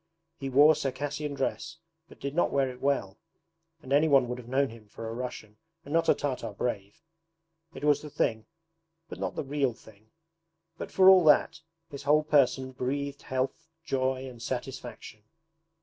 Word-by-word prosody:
He 135 -2 -4
wore 145 +4 +7
Circassian 145 0 -3
dress 160 +4 -3 0.3
but - - -16
did 140 0 -4
not 175 - +2
wear 135 -2 +1
it 125 - -13
well, 125 -8 -1 0.6
and 130 - -3
anyone 140 -3 +4
would 125 +1 -4
have 120 - -11
known 135 +2 +1
him 110 -2 -14
for 115 +2 -8
a 110 - -5
Russian 115 -3 -7 0.3
and 145 - -6
not 165 0 +2
a - - +6
Tartar 125 -6 -3
brave. 100 +1 -4 0.7
It 135 - -9
was 145 -1 +3
the 150 - -8
thing 110 -6 -1 0.6
but - - -8
not - - -3
the - - -2
real 140 -2 0
thing. 110 -1 -19 0.7
But - - -7
for 190 -1 +5
all 190 -2 +8
that, 150 +1 +4 0.3
his 140 - -7
whole 150 +2 +3
person 135 -3 +2
breathed 140 +2 -3
health, 130 +5 -3 0.2
joy, 130 0 -1
and 120 -3 -11
satisfaction. 125 -3 -6
135 Hz, 170 wpm, -28 LUFS, 125-145 Hz, 0.7 s, all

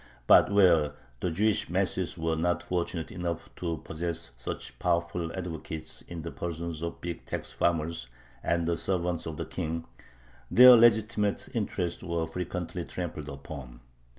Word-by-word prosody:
But - - +7
where 85 -7 +5 0.3
the 90 - 0
Jewish 105 +5 +1
masses 95 -1 0
were 80 0 0
not 85 +2 0
fortunate 85 -2 -2
enough 85 -2 -4
to 85 -2 -2
possess 80 -4 -4
such - - -6
powerful 85 -1 0
advocates 80 -3 -5
in 85 -2 -8
the 85 - -5
persons 85 -1 -4
of 85 0 -2
the - - -23 0.2
big - - -19
tax - - -4
farmers 85 -4 0 0.3
and 85 -1 +1
"servants 90 -3 -1
of 80 -2 -5
the - - -3
king," 80 +1 -3 0.6
their 125 +1 +10
legitimate 110 -2 +3
interests 85 -1 -1
were 85 -1 -1
frequently 90 +1 -4
trampled 80 -4 -5
upon. 70 -3 -8
85 Hz, 145 wpm, -29 LUFS, 80-90 Hz, 0.6 s, their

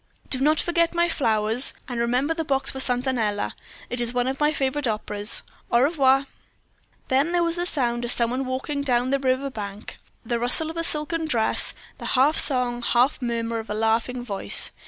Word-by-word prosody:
"Do 260 - +3
not 300 +3 +2
forget 340 0 0
my 340 0 +2
flowers; 225 -5 +2
and 245 -3 -5
remember 250 +6 0
the 325 0 -3
box 270 -2 -1
for 265 - -7
'Satanella.' 245 -5 -1 0.4
It 245 0 -1
is 240 0 0
one 245 0 0
of 265 +1 -3
my 300 0 +2
favorite 275 -1 -2
operas. 210 -1 0 0.3
Au 235 - +4
revoir." 270 -2 +3 0.8
Then 275 +5 +1
there 350 -1 +2
was 335 +1 -2
a 350 - -1
sound 240 -6 -1
of 240 - -3
some 235 -1 +4
one 260 +2 -2
walking 265 +3 -3
down 250 -2 0
the 275 - +1
river 265 +1 -1
bank, 205 -3 -8 0.3
the 235 +1 -2
rustle 280 +7 +2
of 330 - -10
a 330 - -1
silken 320 +1 0
dress, 230 -7 +1 0.2
the - - -8
half 285 +5 +4
song, 250 -3 +3
half 245 +4 +1
murmur 230 -1 -2
of 220 - -9
a 210 - -3
laughing 225 +3 -1
voice. 200 -4 +5
255 Hz, 195 wpm, -23 LUFS, 235-290 Hz, 0.8 s, voice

